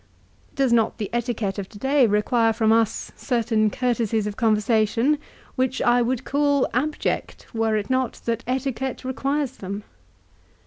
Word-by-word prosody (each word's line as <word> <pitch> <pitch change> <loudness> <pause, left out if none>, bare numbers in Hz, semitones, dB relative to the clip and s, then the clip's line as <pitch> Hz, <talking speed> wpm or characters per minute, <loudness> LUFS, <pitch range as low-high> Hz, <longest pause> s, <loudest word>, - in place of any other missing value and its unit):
Does 265 -3 +2
not 225 -2 +2
the 210 -4 -4
etiquette 230 -4 -2
of 195 - -6
to 205 - -12
day 270 +2 +3
require 225 +2 +2
from 220 0 +2
us 225 -1 +1
certain 225 -3 +1
courtesies 230 -2 0
of 210 -1 -4
conversation, 225 +5 +2 0.4
which 260 0 0
I 245 0 +3
would 250 +1 -1
call 285 -1 +2
abject 295 +5 -2
were 225 -1 +1
it 205 - -3
not 260 -1 +1
that 230 -1 -1
etiquette 265 0 -2
requires 275 +1 -2
them 200 +2 -6
235 Hz, 145 wpm, -23 LUFS, 220-260 Hz, 0.4 s, day